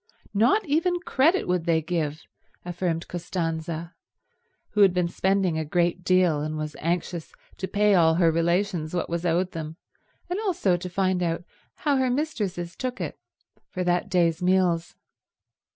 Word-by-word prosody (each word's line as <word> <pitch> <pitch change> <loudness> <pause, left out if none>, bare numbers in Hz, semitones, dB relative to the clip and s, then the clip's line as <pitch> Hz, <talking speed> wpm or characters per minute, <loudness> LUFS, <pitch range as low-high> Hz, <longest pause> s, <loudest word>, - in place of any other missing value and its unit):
Not 245 - +3
even 335 +4 +1
credit 340 +1 +2
would 180 -2 0
they 165 -2 +3
give, 155 -2 -2 0.4
affirmed 175 -1 -2
Costanza, 165 -1 -4 0.8
who 210 - +2
had 190 -3 +6
been 180 -1 +2
spending 190 -2 +1
a - - -1
great 175 +3 0
deal 180 -5 +3
and 155 +1 -3
was 155 -1 -4
anxious 170 0 -2 0.3
to 190 - -3
pay 210 +1 +3
all 165 -3 +5
her 170 -1 +4
relations 170 0 0
what 175 - -2
was 170 +1 -1
owed 180 +2 +1
them 160 -1 -6 0.5
and 360 +3 -2
also 350 - +1
to 180 +1 -5
find 185 0 0
out 170 0 -1 0.3
how 290 -3 +1
her 260 -1 +2
mistresses 205 - -2
took 255 -1 -4
it, - - -5 0.5
for 180 - -3
that 180 +2 0
day's 175 -2 +2
meals. 180 -2 +2
180 Hz, 155 wpm, -25 LUFS, 165-195 Hz, 0.8 s, had